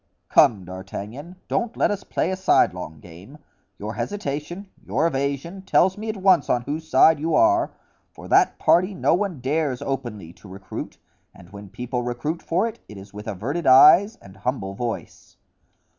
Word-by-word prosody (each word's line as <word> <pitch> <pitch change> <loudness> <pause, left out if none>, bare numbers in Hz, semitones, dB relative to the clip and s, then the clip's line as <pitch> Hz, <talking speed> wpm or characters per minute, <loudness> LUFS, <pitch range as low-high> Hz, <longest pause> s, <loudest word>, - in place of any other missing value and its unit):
"Come, 100 -5 +4
D'Artagnan, 100 - -8
don't 235 0 -2
let - - +2
us 205 -1 -4
play - - -2
a - - -1
sidelong 90 - +1
game; 90 - -14 0.4
your 105 +3 -6
hesitation, 175 - -5 0.2
your 125 +12 0
evasion, 140 +5 -2
tells 190 0 +2
me 215 +2 -6
at 215 - -3
once 190 -2 +3
on 120 - +1
whose 155 +4 -5
side 155 +3 +5
you 160 +2 0
are; 335 0 +3 0.4
for - - -13
that - - +3
party 185 +3 +2
no - - +2
one 180 -6 -2
dares 140 -1 -1
openly 115 -11 -5
to 100 - -16
recruit, 95 0 -8 0.4
and 85 - -16
when 100 -1 -11
people 125 +4 -4
recruit 125 +7 -4
for 185 +7 0
it, 230 0 -8
it 105 - -10
is 100 +1 -13
with 105 +1 -9
averted 135 - -3
eyes 170 - +7
and 95 -1 -15
humble 125 -7 -3
voice." 115 +3 -6
140 Hz, 170 wpm, -23 LUFS, -, 0.4 s, eyes